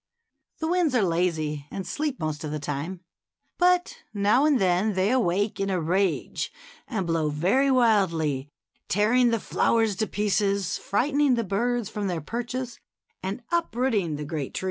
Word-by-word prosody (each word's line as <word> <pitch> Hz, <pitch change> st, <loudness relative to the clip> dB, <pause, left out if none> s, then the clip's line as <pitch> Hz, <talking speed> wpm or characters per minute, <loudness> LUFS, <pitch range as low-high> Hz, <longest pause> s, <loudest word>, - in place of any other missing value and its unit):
The 320 Hz, -, -2 dB
winds 340 Hz, -5 st, +2 dB
are 230 Hz, -, +4 dB
lazy, 160 Hz, -5 st, -1 dB
and 195 Hz, -, -5 dB
sleep 295 Hz, -3 st, -3 dB
most 155 Hz, -1 st, -3 dB
of 155 Hz, -, -3 dB
the 150 Hz, -, -3 dB
time; 150 Hz, +5 st, -4 dB, 0.6 s
but 360 Hz, 0 st, +3 dB, 0.2 s
now 210 Hz, +7 st, +3 dB
and 285 Hz, -4 st, +3 dB
then 190 Hz, +2 st, +2 dB
they 190 Hz, +3 st, +1 dB
awake 205 Hz, -5 st, +1 dB
in 195 Hz, 0 st, 0 dB
a 185 Hz, -2 st, 0 dB
rage 180 Hz, +2 st, 0 dB, 0.4 s
and 215 Hz, -7 st, -2 dB
blow 165 Hz, -2 st, 0 dB
very 190 Hz, -, +2 dB
wildly, 170 Hz, -, +2 dB, 0.4 s
tearing 230 Hz, +5 st, +3 dB
the 230 Hz, -1 st, +1 dB
flowers 225 Hz, 0 st, +1 dB
to 215 Hz, -, 0 dB
pieces, 200 Hz, -2 st, 0 dB
frightening 280 Hz, +5 st, +2 dB
the 230 Hz, -, 0 dB
birds 235 Hz, +3 st, -1 dB
from 210 Hz, -1 st, -3 dB
their 175 Hz, -3 st, -1 dB
perches, 240 Hz, -, -5 dB, 0.4 s
and 195 Hz, +6 st, -4 dB
uprooting 240 Hz, -, 0 dB
the 150 Hz, 0 st, -5 dB
great 150 Hz, -3 st, -4 dB
trees. -, -, -1 dB
200 Hz, 160 wpm, -26 LUFS, 170-245 Hz, 0.6 s, are